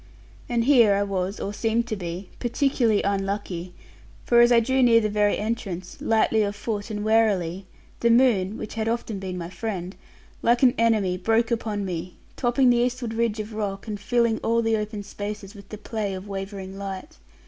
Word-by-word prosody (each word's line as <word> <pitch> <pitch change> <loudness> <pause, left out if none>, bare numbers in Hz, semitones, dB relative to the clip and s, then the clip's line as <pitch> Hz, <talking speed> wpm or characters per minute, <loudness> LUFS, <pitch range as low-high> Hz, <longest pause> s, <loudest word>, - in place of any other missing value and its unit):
And 235 -1 +1
here 235 -6 +5
I 200 - +1
was, 195 0 -2
or 200 - -4
seemed 225 +2 0
to 215 - -1
be, 180 0 -6
particularly 240 -3 +1
unlucky; 195 -3 -2 0.5
for 235 -1 +5
as 240 +1 +6
I 235 - +7
drew 260 +3 +1
near 235 -2 +6
the 215 -1 0
very 205 0 +2
entrance, 200 -5 -4
lightly 220 0 +2
of 205 -1 -1
foot 205 0 -4
and 210 -1 -4
warily, 195 -5 +1 0.3
the 235 - +2
moon 230 -5 +3
(which - - -6
had 220 -1 -2
often 230 -3 -3
been 185 -1 -5
my 170 0 -6
friend) 190 -4 -4 0.5
like 240 +2 +3
an 250 -2 +6
enemy 215 -6 +2
broke 225 +4 +1
upon 215 -3 -1
me, 180 -1 -5 0.2
topping 250 0 +3
the 240 - +3
eastward 240 -1 -1
ridge 225 -1 0
of 215 +1 -5
rock, 205 -1 -4
and 210 -2 -4
filling 235 +1 +1
all 230 +1 +1
the 225 0 +2
open 210 -1 -4
spaces 205 0 -6
with 200 -2 -14
the 215 - -7
play 210 -2 -3
of 190 +2 -8
wavering 195 -1 -6
light. 200 - -7
215 Hz, 190 wpm, -25 LUFS, 195-230 Hz, 0.5 s, I